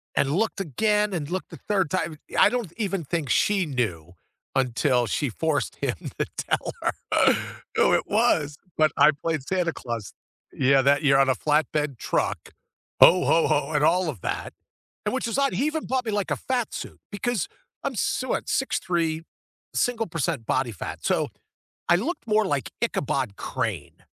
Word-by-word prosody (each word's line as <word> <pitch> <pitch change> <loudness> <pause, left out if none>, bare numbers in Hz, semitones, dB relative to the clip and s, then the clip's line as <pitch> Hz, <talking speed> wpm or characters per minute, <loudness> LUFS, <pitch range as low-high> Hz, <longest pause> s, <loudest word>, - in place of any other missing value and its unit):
and 140 - +2
looked 220 0 0
again 210 - +1
and 155 -5 -3
looked 185 0 -3
the - - -10
3rd 195 -7 0
time 170 -4 -2 0.2
I - - +7
don't 240 -8 -2
even 195 -5 -1
think 155 -2 -2
she 195 - +3
knew 100 - -2 0.4
until 125 -1 +2
she 145 +6 0
forced 155 +4 -1
him 130 -6 -1 0.2
to - - +2
tell - - -1
her. - - +2 0.8
Oh, - - +4
it - - +2
was, 160 -10 +2 0.2
but 155 -1 +4
I - - +7
played 155 +1 -2
Santa 175 +3 -1
Claus 115 -5 -5 0.4
Yeah, 135 0 +4
that 140 +2 +4
you're 140 -3 +4
on 135 -1 +4
a 130 - +3
flatbed 150 0 0
truck, - - -2 0.5
"Ho! 180 +1 +8
Ho! 165 - +4
Ho!" 150 -1 +1
and 150 -1 +1
all 180 +3 +3
of 130 - -4
that, - - -3 0.5
and 210 - -1
which 260 - -1
is 230 +4 -1
odd, 275 -1 +2
he 275 - +1
even 310 +1 -2
bought 260 -1 0
me 220 - -1
like 205 -2 -1
a - - +1
fat 245 -4 -2
suit - - -7
because 210 -1 -1 0.4
I'm - - -1
s - - 0
what - - -1
6'3 165 -2 0 0.5
single 235 -2 +1
percent 160 - -2
body 130 0 0
fat. 95 - -7
So, - - +1 0.6
I 175 - +6
looked 295 - -3
more 215 0 +3
like 135 - -1
Ichabod 135 - -1
Crane - - -4
160 Hz, 175 wpm, -25 LUFS, 135-205 Hz, 0.8 s, Ho